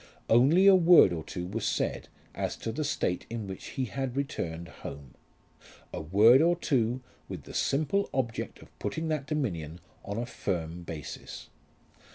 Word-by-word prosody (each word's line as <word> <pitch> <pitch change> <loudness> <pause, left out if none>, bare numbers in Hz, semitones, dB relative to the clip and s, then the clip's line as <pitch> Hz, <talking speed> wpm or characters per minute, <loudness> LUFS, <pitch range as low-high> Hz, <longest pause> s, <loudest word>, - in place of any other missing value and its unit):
Only 140 +11 +6
a 200 - +9
word 175 - +7
or 80 -2 -4
two 90 +3 -5
was 100 +4 -4
said - - -1 0.3
as - - -3
to 115 - -4
the 155 +7 -2
state 115 -11 -1
in 115 -2 -4
which 95 -1 -7
he 130 - +1
had 130 +1 -4
returned 85 - -3
home, 70 -2 -10 0.8
a - - -4
word 105 - +6
or 170 +2 +4
two 125 -6 0 0.3
with - - -6
the - - -11
simple 155 +8 +1
object 115 -4 -3
of - - -21
putting 160 0 -3
that 150 -3 -2
dominion 90 - -3 0.2
on 100 - -5
a 120 - -1
firm 85 -7 -3
basis. 80 -3 -8
115 Hz, 165 wpm, -29 LUFS, 90-145 Hz, 0.8 s, a